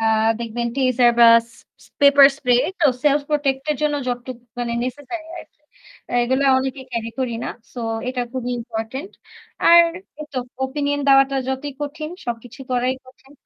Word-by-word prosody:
আ - - -4 0.4
দেখবেন 235 +1 -3
টিজার 255 -2 +3
বা - - +9 0.6
স - - -18
paper 280 -1 +8
spray 250 -4 0 0.3
তো 310 - +5 0.2
সেলফ 290 0 +3
প্রটেক্ট 275 -3 0
এর 295 - 0
জন্য 300 -1 +1
যতটুকু 245 0 -5 0.2
মানে 240 -1 -2
নেসেসারি 290 +6 -6
আরকি। - - -14 0.5
অ্যা 245 - -2
এগুলো 260 +3 +1
অনেকে 265 +1 -3
ক্যারি 230 -1 -3
করি 250 -3 -1
না। - - -3 0.3
সো 245 - -6 0.3
এটা 255 -1 -2
খুবই 250 -1 -3
ইম্পোর্টেন্ট। 235 - -6 0.6
আর 340 0 +9 0.4
ওইতো 295 -4 -5 0.3
ওপিনিয়ন 285 +1 -2
দেওয়াটা 275 0 +5
যতই 265 +2 -3
কঠিন 305 +2 -5 0.2
সবকিছু 240 +3 -6
করাই 250 +1 +1
কঠিন। 270 +2 -19
265 Hz, 155 wpm, -21 LUFS, 245-285 Hz, 0.6 s, বা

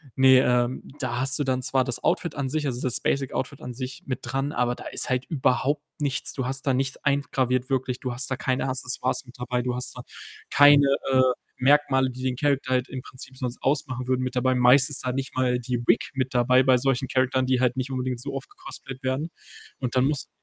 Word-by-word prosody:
ne, 130 -1 +7
ähm, 125 -1 +1 0.2
da 120 -3 -2
hast 135 0 +1
du 145 - 0
dann 130 -1 0
zwar 130 +1 +1
das 125 -1 -4
Outfit 170 - 0
an 135 -2 -2
sich, 150 +1 -1
also, 125 -2 -2
das 125 -2 -1
Basic 135 -2 -1
Outfit 135 +2 -4
an 125 - -6
sich 130 0 -6
mit 130 - -2
dran, 135 +4 -2
aber 125 0 0
da - - -11
ist - - -4
halt 130 0 0
überhaupt 145 0 +1 0.2
nichts. 140 -4 -1
Du 130 -2 -3
hast 135 +1 -4
da 135 - +3
nichts 130 0 -1
eingraviert 130 -2 0
wirklich, 130 -2 -1
du 130 -2 -4
hast 130 +2 -2
da - - +1
keine 130 +1 -1
Accessoires 130 0 -2
mit 125 - -14
dabei, 125 0 -1
du 125 0 -2
hast 125 0 -5
da 125 - -7 0.5
keine, 145 0 +7 0.2
äh, 130 0 +5 0.4
Merkmale, 135 -1 +3
die 130 +1 -8
den 130 -1 0
Character 140 -1 0
halt 125 0 +1
im 130 -1 -5
Prinzip 130 +1 -11
sonst 125 -1 -4
ausmachen 130 -3 -1
würden, 130 0 +1
mit 130 - -3
dabei. 130 +1 +2
Meist 125 +3 +5
ist 140 - -4
da 125 - 0
nicht 135 0 -4
mal 125 -1 +1
die 125 0 -2
Wig 115 - +2
mit 130 -1 -1
dabei 125 +1 +4
bei 130 -1 +5
solchen 135 0 0
Characteren, 130 0 +1
die 130 -1 +2
halt 125 0 +1
nicht 130 +1 -2
unbedingt 130 -1 -2
so 140 - -6
oft 390 - -6
gecosplayt 360 - -10
werden 135 +5 -1 0.5
und 125 -1 -3
dann 130 +1 +4
musst 145 -1 -1
130 Hz, 230 wpm, -25 LUFS, 125-135 Hz, 0.5 s, ne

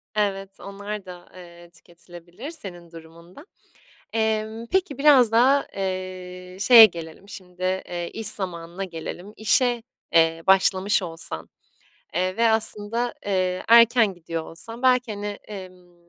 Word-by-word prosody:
Evet, 195 -2 -2
onlar 200 +1 -7
da, 180 -1 -11
eee, 175 -1 -14
tüketilebilir 175 - -12
senin 175 - -8
durumunda. 170 - -14 0.7
Emm, 220 0 -2
peki 375 -8 0
biraz 275 -6 +5
da, 265 +5 +4
eee, 185 -1 -6
şeye 230 0 +9
gelelim 170 +1 -10
şimdi, 180 -2 -12
eee, 180 -2 -3
iş 225 -1 -3
zamanına 180 -2 -1
gelelim. 175 +3 -8
İşe, 240 +2 +2 0.3
eee, 165 0 +3
başlamış 190 +1 +3
olsan, 165 - -5 0.7
eee, 185 +3 -1
ve 230 0 +3
aslında, 220 +2 -1
eee, 185 -2 -1
erken 230 -2 +6
gidiyor 165 -2 -6
olsan 225 +9 -9
belki 250 -3 +2
hani, 205 0 -5
emm, 185 -3 -10
190 Hz, 125 wpm, -23 LUFS, 175-220 Hz, 0.7 s, şeye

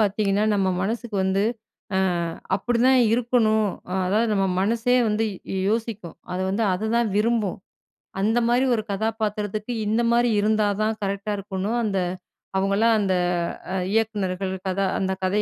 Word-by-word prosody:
பாத்தீங்கன்னா, 205 0 +1
நம்ம 190 -1 +1
மனசுக்கு 220 0 -2
வந்து 190 +1 +1 0.5
அ - - +3 0.6
அப்பிடிதான் 245 +5 +3
இருக்கணும். 225 -3 +2 0.2
அ - - -2
அதாவது 220 +4 +2
நம்ம 195 - +2 0.2
மனசே 230 +5 +1
வந்து 215 +1 +1 0.3
யோ 190 - -1
யோசிக்கும். 220 -6 -3 0.2
அது 185 +1 -2
வந்து 205 +4 0
அத 205 +4 -2
தான் 235 -1 +2
விரும்பும். 215 -3 +1 0.6
அந்தமாரி 235 +4 +2
ஒரு 220 - -1
கதாபாத்திரத்துக்கு, 215 +1 -2
இந்தமாரி 235 +2 +2
இருந்தா 215 0 +2 0.2
தான் 220 0 0
கரெக்ட்டா 200 +1 -2
இருக்கணும். 200 +4 -2
அந்த 195 -3 0 0.6
அவுங்கள்லாம் 200 +4 +3
அந்த, 190 -3 +1 0.6
அ - - -1 0.2
இயக்குனர்கள், 195 -4 -1
கதா 195 +1 0
அந்த 190 -1 0
கதை 200 +3 +2
215 Hz, 135 wpm, -24 LUFS, 195-230 Hz, 0.6 s, அ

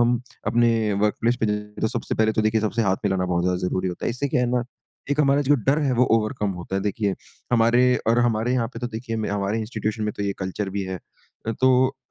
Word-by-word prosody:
हम 120 0 +3 0.3
अपने 115 -2 +2
वर्कप्लेस 115 +3 +1
पे 110 - +2
जाए 105 0 0 0.2
तो 110 - +3
सबसे - - -3
पहले 110 0 +2
तो 110 - +1
देखिए 110 0 +2
सबसे 110 +2 0
हाथ 95 -2 +2
मिलाना 95 -2 +1
बहुत 85 -1 0
ज़्यादा 90 0 +1
ज़रूरी 95 0 -1
होता 90 - -5
है। - - +1
इससे 140 +4 -2
क्या 125 - +1
है 125 - +2
ना 125 -1 +1 0.5
एक 145 +1 +2
हमारा 140 0 +3
जो 145 +2 +4
डर 140 +3 +4
है 135 -3 +1
वो 125 +1 +4
ओवरकम 110 -2 -2
होता 95 +2 -4
है 95 - -1
देखिए 100 -1 -1 0.4
हमारे 115 +1 +4 0.3
और 115 +1 +4
हमारे 120 0 +1
यहाँ 120 -3 +1
पे - - -5
तो 120 - -3
देखिए 115 0 -5
हमारे 100 +1 -1
इंस्टीट्यूशन 110 -1 -3
में 105 - -1
तो - - -3
ये 100 -1 0
कल्चर 95 +1 -3
भी 100 0 -2
है। 95 -1 -4 0.6
तो 130 +1 +4
110 Hz, 240 wpm, -23 LUFS, 100-120 Hz, 0.6 s, जो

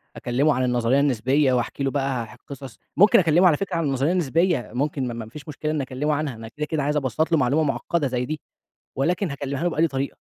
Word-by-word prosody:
أكلمه 140 +5 +1
عن 130 - 0
النظرية 125 +2 +2
النسبية 135 +1 +2
واحكي 125 +3 -1
له 135 - 0
بقى 135 -5 -1
ح 125 - -14
قصص، 135 -5 -9 0.2
ممكن 200 +1 +7
أكلمه 175 +2 +4
على 155 - +4
فكرة 195 -3 -3
عن 165 - 0
النظرية 140 +3 +1
النسبية، 165 - +1
ممكن 135 0 -1
ما 120 - -4
ما 115 -1 -6
ما 110 - -15
فيش 150 0 -11
مشكلة 150 +1 -3
إن 155 -2 -1
أكلمه 135 +3 -2
عنها، 145 -4 -2
أنا 110 0 -9
كده 150 +6 -5
كده 150 -2 -2
عايز 150 +1 0
أبسّط 150 +5 -1
له 165 - +4
معلومة 140 +4 +2
معقدة 150 +1 -1
زي 125 -1 -2
دي، 155 +2 -4 0.6
ولكن 175 +4 0
هاكلمها 140 +2 -4
له 175 - +2
بأنهي 165 0 +2
طريقة؟ 135 -1 -4
140 Hz, 235 wpm, -23 LUFS, 130-155 Hz, 0.6 s, ممكن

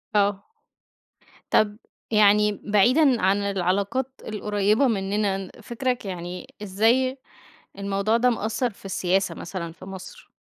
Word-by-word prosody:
آه. 200 -1 +2 1.1
طَب 210 0 +3 0.3
يعني 210 0 +5
بعيدًا 245 - +4
عن 190 +2 +3
العلاقات 200 +6 -1 0.2
القريبة 210 +3 +1
منّنا، 195 -2 -1
فكرَك 245 +1 -2
يعني 180 +7 -7
إزاي 235 +7 +2 0.6
الموضوع 200 +3 0
ده 250 +1 +3
مأَثَّر 225 +2 -1
في 200 - -18
السياسة 190 0 0
مثلًا 170 -4 -6
في 185 - -13
مصر؟ 190 -1 -10
205 Hz, 110 wpm, -24 LUFS, 195-230 Hz, 1.1 s, يعني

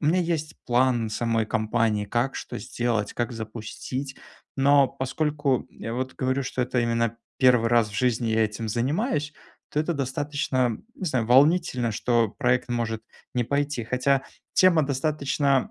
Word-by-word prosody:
у 150 - -1
меня 175 +4 +3
есть 160 -3 -2
план 120 -2 +2
самой 115 -1 0
кампании: 110 -2 0
как 120 +5 0
что 120 - -6
сделать, 120 -3 -2
как 120 +1 -2
запустить. 115 +4 -6 0.4
Но 140 0 +5
поскольку, 145 0 -1
я 115 +1 -6
вот 130 +1 -3
говорю, 130 +1 0
что 130 - -3
это 125 0 0
именно 115 -1 0 0.2
1 125 -3 +5
раз 115 -2 +3
в - - -11
жизни 120 -2 +1
я 110 0 +3
этим 110 +1 -4
занимаюсь, 150 - -1 0.4
то 150 - 0
это 170 +2 0
достаточно, 135 -3 -1 0.2
не 190 - -7
знаю, 130 -6 +1
м, - - -9
волнительно, 130 -3 +4
что 115 +1 +2
проект 125 +2 0
может 115 -2 -2 0.3
не 120 -2 +1
пойти. 140 -2 -1
Хотя 130 +3 +1 0.3
тема 175 -4 +5
достаточно 140 -1 0
125 Hz, 155 wpm, -25 LUFS, 115-140 Hz, 0.4 s, Но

